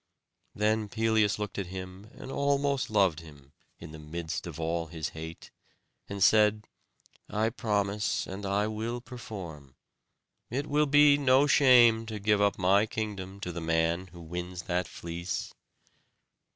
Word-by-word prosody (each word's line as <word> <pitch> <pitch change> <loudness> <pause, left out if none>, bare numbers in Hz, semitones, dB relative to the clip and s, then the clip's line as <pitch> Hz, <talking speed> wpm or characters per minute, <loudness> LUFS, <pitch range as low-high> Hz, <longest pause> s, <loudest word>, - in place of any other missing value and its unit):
Then 105 0 +1
Pelias 110 -1 +2
looked 105 -2 -4
at 95 - -3
him 95 +2 -8
and 135 -1 -9
almost 140 -1 0
loved 95 -7 +2
him, 70 -4 -15 0.2
in - - -10
the 80 - -10
midst 80 +2 -5
of 85 -2 -8
all 80 0 -2
his 80 -1 -4
hate; 80 +1 -9 0.6
and 100 -1 -1
said, 105 0 +4 0.6
"I 110 +2 0
promise, 105 -3 -1
and 95 +2 -7
I 100 +1 0
will 110 +3 -3
perform. 95 - -9 0.7
It 135 +5 -2
will 150 0 +2
be 145 0 +6
no 135 0 +4
shame 120 -6 +5
to 110 -1 -5
give 105 0 +2
up 100 0 +2
my 100 +3 +3
kingdom 100 -3 -5
to 90 - -4
the 85 0 -6
man 80 +2 0
who 85 -1 -13
wins 90 +2 -6
that 90 -1 -1
fleece." 85 +3 -5
100 Hz, 150 wpm, -29 LUFS, 85-110 Hz, 0.7 s, be